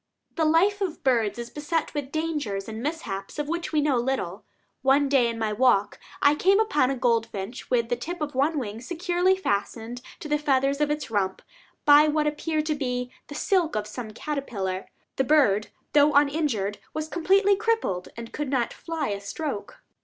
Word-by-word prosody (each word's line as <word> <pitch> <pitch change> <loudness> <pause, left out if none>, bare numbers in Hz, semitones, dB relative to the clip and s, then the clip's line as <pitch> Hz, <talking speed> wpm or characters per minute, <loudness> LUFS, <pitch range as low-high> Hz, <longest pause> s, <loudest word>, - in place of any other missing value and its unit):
The 320 - +1
life 380 +6 +3
of 370 -5 -3
birds 235 -5 +2
is 235 0 -6
beset 300 +2 -2
with 285 -2 -4
dangers 295 -12 -2
and 220 0 -6
mishaps 235 -10 -4
of 295 -1 -2
which 340 0 -3
we 305 -2 +2
know 285 -3 +2
little. 235 -7 -2 0.4
One 275 +2 +4
day, 270 -3 +4
in 230 -1 -3
my 220 -1 -1
walk, 215 -3 +2 0.2
I 285 - +6
came 385 +6 +3
upon 295 -12 +2
a 275 - 0
goldfinch 230 -3 -1
with 235 -2 +1
the 245 - +2
tip 345 +9 -6
of 300 -1 -3
one 285 +5 +1
wing 225 -4 -4
securely 355 +5 +1
fastened 230 - -2 0.2
to - - -7
the 300 0 +1
feathers 275 0 +1
of 295 - +2
its 295 -5 -3
rump, 190 -3 -1 0.4
by 295 +1 +8
what 300 0 +1
appeared 305 +1 -1
to 310 - +1
be 250 -3 -3 0.2
the 290 - -8
silk 355 -1 +1
of 210 -1 -1
some 220 +2 -6
caterpillar. 215 -7 -4 0.3
The 265 - +3
bird, 240 -8 +3 0.3
though 295 0 +5
uninjured, 280 -9 +1 0.2
was 310 0 -2
completely 390 +5 +3
crippled, 420 - 0
and 230 0 -8
could 295 -2 -3
not 255 -3 0
fly 325 -5 -3
a 200 -1 -3
stroke. 240 +2 -5
280 Hz, 185 wpm, -26 LUFS, 230-310 Hz, 0.4 s, by